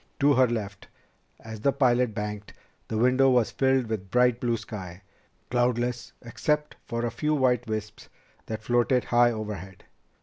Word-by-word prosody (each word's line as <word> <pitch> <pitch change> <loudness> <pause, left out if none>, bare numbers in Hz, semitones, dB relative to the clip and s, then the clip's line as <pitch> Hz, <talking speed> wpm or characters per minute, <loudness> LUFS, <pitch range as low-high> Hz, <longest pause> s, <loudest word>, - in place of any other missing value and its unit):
To 145 +1 +4
her 130 -1 +4
left, 105 -4 -5 0.5
as 110 -1 -9
the 140 - +3
pilot 125 -4 +2
banked, 105 -1 -5 0.3
the 110 - -3
window 130 +3 +4
was 125 -3 +2
filled 130 -1 +2
with 110 -4 -5
bright 125 +1 +3
blue 120 -2 0
sky, 100 -4 -8 0.5
cloudless 120 0 0
except 150 +5 -1
for 115 0 -2
a 120 - -2
few 150 +6 -1
white 125 -3 +1
wisps 105 -1 -5 0.4
that 110 -1 -5
floated 120 +2 +2
high 120 0 +4
overhead. 105 -5 -7
120 Hz, 155 wpm, -26 LUFS, 110-125 Hz, 0.5 s, To